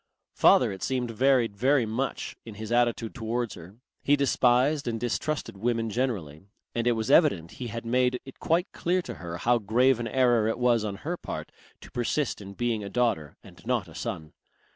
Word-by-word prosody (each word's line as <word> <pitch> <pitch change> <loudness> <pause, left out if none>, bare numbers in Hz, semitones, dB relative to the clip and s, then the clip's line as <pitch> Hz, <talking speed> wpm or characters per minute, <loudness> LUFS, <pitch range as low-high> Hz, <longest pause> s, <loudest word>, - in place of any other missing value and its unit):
Father - - +5
it 95 -1 -8
seemed 125 -2 -1
varied 125 -2 +2
very 130 +3 +3
much 120 +5 -3
in 110 -3 -10
his 110 +1 -7
attitude 120 -2 +1
towards 120 -1 -2
her. 90 +5 -12 0.3
He 145 - +4
despised 135 +1 +2
and 115 -1 -1
distrusted 125 0 -2
women 115 +1 -1
generally, 100 - -3 0.3
and 120 0 -1
it 120 - +4
was 110 +3 -1
evident 120 - +4
he 125 - -3
had 115 +1 -6
made 125 +1 +1
it 135 - -12
quite 170 +3 +1
clear 180 +1 0
to - - -6
her 85 -1 -5
how 120 +6 +2
grave 120 +4 +3
an 120 - -2
error 120 -4 +3
it 115 - -1
was 120 -2 +2
on 105 -2 -3
her 175 +3 -2
part - - -6 0.3
to - - -13
persist 120 +1 -1
in 100 0 -9
being 115 -2 -1
a 100 - -5
daughter 115 - 0
and - - -15
not - - 0
a - - -13
son. 80 -1 -5
120 Hz, 195 wpm, -27 LUFS, 110-130 Hz, 0.3 s, Father